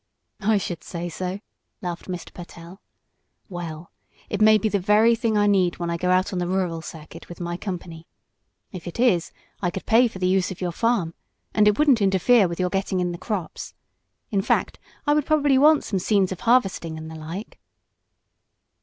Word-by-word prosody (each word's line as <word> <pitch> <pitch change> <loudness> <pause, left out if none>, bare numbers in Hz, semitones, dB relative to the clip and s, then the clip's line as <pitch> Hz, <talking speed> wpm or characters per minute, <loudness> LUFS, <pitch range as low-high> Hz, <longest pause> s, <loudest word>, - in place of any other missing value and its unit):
"I 215 +1 +2
should 175 -3 -4
say 175 0 -5
so," 185 +4 -5 0.4
laughed 175 -2 -6
Mr. 180 -2 -6
Pertell. 175 +1 -11 0.7
"Well, 170 -2 -7 0.4
it 205 - -2
may 215 0 +7
be 215 - 0
the 205 -1 0
very 210 +5 +4
thing 230 -2 0
I 205 - +3
need 190 -4 +2
when 170 -1 -3
I 170 - -1
go 180 +1 -1
out 185 +2 +2
on 180 - -1
the 175 - -1
rural 180 -3 -1
circuit 160 +1 -11
with 175 - -10
my 175 -1 -3
company. 175 -3 -7 0.6
If 180 -3 -8
it 175 - -7
is, 195 -9 +2 0.3
I 175 - +1
could 190 - -6
pay 240 +2 +5
for 215 - -9
the 185 - -1
use 185 0 +2
of 190 - -7
your 180 -2 -2
farm, 200 -4 0 0.4
and 210 -1 +4
it 210 - +3
wouldn't 280 -7 +4
interfere 195 +2 +4
with 170 +1 -6
your 180 -1 0
getting 195 -1 -1
in 175 -1 0
the 170 - -7
crops. 205 -7 -5 0.6
In 200 -2 +1
fact, - - 0 0.3
I 295 - +3
would 300 -1 +1
probably 290 -4 +3
want 300 +1 +5
some 195 - -2
scenes 195 0 +1
of 185 - -5
harvesting, 195 -9 +1
and 160 0 -8
the 160 - -9
like." 165 +7 -8
185 Hz, 200 wpm, -24 LUFS, 175-215 Hz, 0.7 s, may